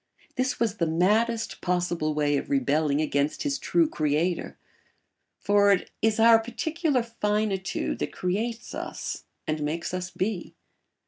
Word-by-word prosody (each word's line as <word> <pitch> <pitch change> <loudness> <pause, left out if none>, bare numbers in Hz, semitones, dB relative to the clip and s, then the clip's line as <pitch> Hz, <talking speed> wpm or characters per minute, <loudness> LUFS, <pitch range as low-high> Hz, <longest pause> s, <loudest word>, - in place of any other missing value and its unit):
This 255 0 -1
was 225 -3 0
the 170 - +1
maddest 220 +8 +1
possible 175 -4 0
way 145 -1 +2
of 140 - -2
rebelling 145 +2 +2
against 145 -1 0
his 285 -2 -1
true 335 -2 +2
creator; 160 - -1 0.8
for 205 0 +4
it 195 - +1
is 220 0 +2
our 225 0 +7
particular 270 +4 -1
finitude 210 -4 -1
that - - -2
creates 225 +6 -3
us - - -5 0.2
and 155 0 -2
makes 160 +4 -2
us 180 0 -3
be. 190 -1 -3
190 Hz, 135 wpm, -26 LUFS, 155-230 Hz, 0.8 s, our